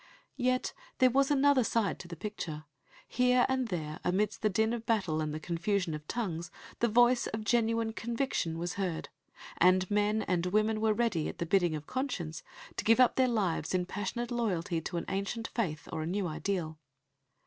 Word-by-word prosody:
Yet 255 0 +1 0.2
there 255 -1 +5
was 275 +2 +3
another 285 -2 +4
side 220 -3 0
to 175 - -9
the 170 - -7
picture; 165 -5 -5 0.4
here 250 0 +3
and 260 -2 0
there, 155 -6 -4
amidst 195 +2 0
the 215 - +3
din 220 +3 +1
of 235 -2 -3
battle 185 -9 +1
and 155 -1 -2
the 155 - -4
confusion 175 +2 -1
of 150 0 -7
tongues, 175 -8 -3 0.3
the 235 - +3
voice 240 +2 +4
of 220 0 -4
genuine 230 0 +1
conviction 230 -9 -2
was 175 +1 -3
heard; 185 -5 -3 0.5
and 185 +1 +4
men 210 +1 +2
and 180 -1 0
women 215 +3 +1
were 220 0 +3
ready, 225 -9 +1
at - - -8
the 170 - -2
bidding 175 -2 +2
of 150 -1 -6
conscience, 195 - -3 0.4
to - - -1
give 225 +2 +4
up 255 - +5
their 260 -1 +4
lives 190 -8 0
in 180 -1 +1
passionate 205 +6 -4
loyalty 190 -8 -1
to 175 +2 -4
an 170 - -3
ancient 200 +4 -3
faith 155 -11 -2
or - - -2
to - - -2
a 165 - -2
new 200 0 -1
ideal. 160 -1 -3
205 Hz, 190 wpm, -31 LUFS, 170-235 Hz, 0.5 s, there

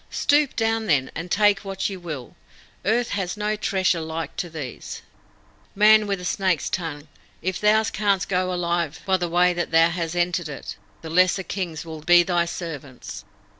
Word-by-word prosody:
Stoop 290 -1 +2
down, 225 -1 0
then, 135 -4 +2
and 170 +2 -6
take 205 0 +4
what 195 -2 -3
ye 195 - -5
will. 155 -9 -7 0.5
Earth 235 +3 +2
has 195 -1 -2
no 210 0 0
treasure 190 -5 +1
like 160 -1 -5
to 180 -1 -3
these. 150 -7 -7 0.7
Man 215 +1 +6
with 200 -1 0
the 180 - -8
snake's 185 -3 0
tongue, 155 -4 -4 0.4
if 185 +1 -2
thou 215 +1 +4
canst 200 -3 0
go 185 -1 0
alive 170 -3 -1
by 190 -1 +3
the 175 -1 -2
way 180 +1 +3
that 175 0 -2
thou 165 +1 +5
hast 170 -1 -3
entered 175 -2 0
it, 140 - -7 0.3
the 160 - -6
lesser 185 +2 +3
Kings 175 -5 -4
will 160 -1 -8
be 175 +2 +6
thy 175 -1 +1
servants!" 155 -7 -7
175 Hz, 175 wpm, -23 LUFS, 165-195 Hz, 0.7 s, Man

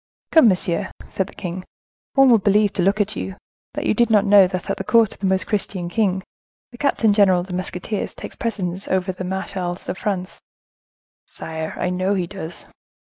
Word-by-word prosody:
"Come, 320 -7 +7
monsieur," 185 -1 +1 0.2
said 190 - -2
the - - -13
king, 180 +1 -5 0.5
"one 270 -2 +6
would 225 -4 +4
believe, 205 0 +3
to - - -1
look 195 +4 +2
at 210 +1 0
you, 190 - -5 0.4
that - - -3
you - - +3
did 235 -1 +2
not 210 -2 +4
know 200 -2 +7
that 185 0 -5
at - - -2
the - - -4
court 230 -3 +3
of - - -17
the 195 - 0
most 190 -2 +1
Christian 190 -4 -2
king, 190 -1 0 0.5
the 240 - -14
captain 225 -6 +2
general 195 -3 +4
of - - -7
the 185 - -8
musketeers 185 +3 -3
takes - - -9
precedence 195 -5 -3
of 190 -1 +1
the 185 -1 -4
marechals 185 -1 -4
of 185 - -4
France." 190 -3 -3 0.9
"Sire, 160 0 -5
I 180 - -1
know 185 +2 0
he 185 -2 0
does." 170 -2 -8
190 Hz, 200 wpm, -21 LUFS, 180-210 Hz, 0.9 s, Come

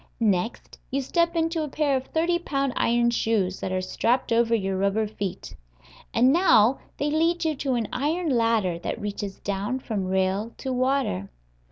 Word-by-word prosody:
Next 210 -1 -1
you 275 - -1
step 335 +5 +1
into 330 0 0
a - - -3
pair 285 -1 +1
of 260 0 -3
thirty 345 +2 +1
pound 275 -6 -1
iron 235 0 +2
shoes 210 -5 0
that 185 - -3
are 185 0 0
strapped 235 +7 0
over 230 0 +3
your 195 -3 -1
rubber 200 +3 +1
feet. 205 -3 -6 0.6
And 255 +3 +4
now 275 - +5 0.2
they 290 +1 -1
lead 330 +2 +1
you 315 - +2
to 265 -2 -1
an 230 -3 -1
iron 315 +6 0
ladder 225 -8 +1
that - - -4
reaches 205 -1 -5
down 205 +5 -2
from 210 -7 -3
rail 190 +4 0
to 265 - -3
water. 255 - 0
235 Hz, 175 wpm, -25 LUFS, 200-280 Hz, 0.6 s, now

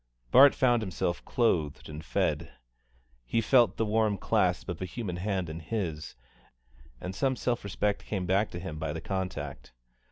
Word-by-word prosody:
Bart 140 +1 +8
found 120 -3 +3
himself 90 -3 -2
clothed 85 - 0
and 75 +1 -8
fed; - - -1 0.7
he - - 0
felt 120 +1 +4
the 110 - +1
warm 110 -1 +2
clasp - - +1
of 85 -1 -5
a - - -1
human 90 -1 -5
hand 95 -1 -1
in 80 +1 -6
his, 85 -4 -4 0.8
and 90 - -5
some 130 +6 +1
self 120 -1 -1
respect 100 +1 -1
came 95 -4 -2
back 95 +4 +2
to 85 - -6
him 80 -4 -6
by 80 -2 -2
the 80 - -5
contact. 75 -11 -4
95 Hz, 165 wpm, -29 LUFS, 80-110 Hz, 0.8 s, Bart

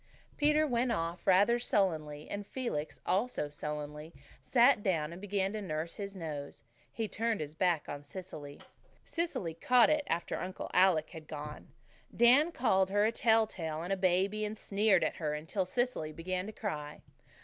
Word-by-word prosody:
Peter 300 +1 +3
went 245 -3 +1
off 165 -3 -3
rather 200 +6 +5
sullenly, 155 -10 0
and 205 0 -5
Felix, 200 - -4
also 190 -5 0
sullenly, 150 +1 -5 0.3
sat 245 -2 +4
down 165 -6 0
and 175 - -10
began 200 -1 -1
to 215 - -3
nurse 160 -3 -3
his 200 -1 -5
nose. 150 -5 -6 0.3
He 225 -1 -3
turned 225 +1 -1
his 150 -1 -5
back 170 -2 +1
on 145 0 -5
Cecily. 145 -2 -9 0.5
Cecily 330 - -2
"caught 245 - +4
it" 305 -1 +2
after 170 +1 -1
Uncle 185 +1 -5
Alec 180 -4 +4
had 160 -3 -10
gone. 150 0 -7 0.5
Dan 260 +8 +6
called 190 - +2
her 205 +1 +3
a 220 - +2
tell 225 -1 +4
tale 160 -5 -5
and 185 +3 -1
a - - +2
baby, 190 +3 +1
and 210 +1 -3
sneered 200 -3 +2
at - - -1
her 150 -2 -1
until 160 +5 -2
Cecily 240 -8 -1
began 180 +4 -3
to - - -5
cry. 150 -9 -5
190 Hz, 170 wpm, -32 LUFS, 155-220 Hz, 0.5 s, Dan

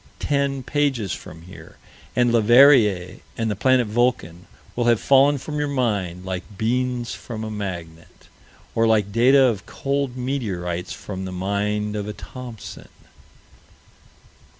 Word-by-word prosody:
Ten 140 -2 -1
pages 135 -8 0
from 80 +1 -10
here, 90 - -13 0.4
and 120 -1 +3
Leverrier 115 -6 +5 0.2
and 115 -1 -1
the - - -2
"planet 130 +4 +3
Vulcan" 105 -7 -1 0.3
will 120 - 0
have 120 -2 +4
fallen 140 +1 +4
from 150 +3 -5
your 145 - 0
mind, 100 -10 -2
like 95 +2 -6
beans 125 +1 -1
from 110 -2 -7
a 110 - -5
magnet, 85 -6 -7 0.5
or 115 0 +2
like 105 -3 +2
data 130 +5 +5
of 115 -6 0
cold 140 -2 -2
meteorites 95 -10 -3
from 95 -2 -6
the 95 - -6
mind 105 +3 -2
of 105 -1 -3
a 105 - -4
Thomson. 120 -1 -10
115 Hz, 135 wpm, -22 LUFS, 95-130 Hz, 0.5 s, Leverrier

